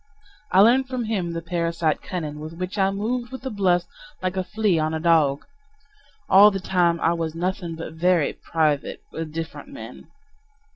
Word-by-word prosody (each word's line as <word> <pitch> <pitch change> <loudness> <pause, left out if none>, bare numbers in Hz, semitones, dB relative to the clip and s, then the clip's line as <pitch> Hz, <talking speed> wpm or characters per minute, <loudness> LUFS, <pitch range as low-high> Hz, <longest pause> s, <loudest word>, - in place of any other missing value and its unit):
I 190 - +6
learned 255 +5 +5
from 255 -2 -3
him 195 -6 -2
the 165 0 -4
parasite 170 -2 -1
cunning 155 -6 -5
With 155 +2 -7
which 185 +3 -5
I 190 0 +4
moved 235 +5 -2
with 260 -1 -8
the 265 - -4
bluffs, 185 -4 +2 0.4
like 185 0 -1
a 185 - 0
flea 210 -4 +1
on 155 +1 0
a - - -2
dog. 155 -4 +3 0.8
All 200 +2 +8
the 195 -2 -3
time 175 -2 +1
I 165 - +3
was 165 -2 -3
nothing 175 -1 -3
but 160 -1 -7
"very 170 -1 +2
private," 155 -3 -1
with 160 -1 -5
different 160 -2 -6
men. 115 +3 -10
175 Hz, 180 wpm, -23 LUFS, 160-195 Hz, 0.8 s, All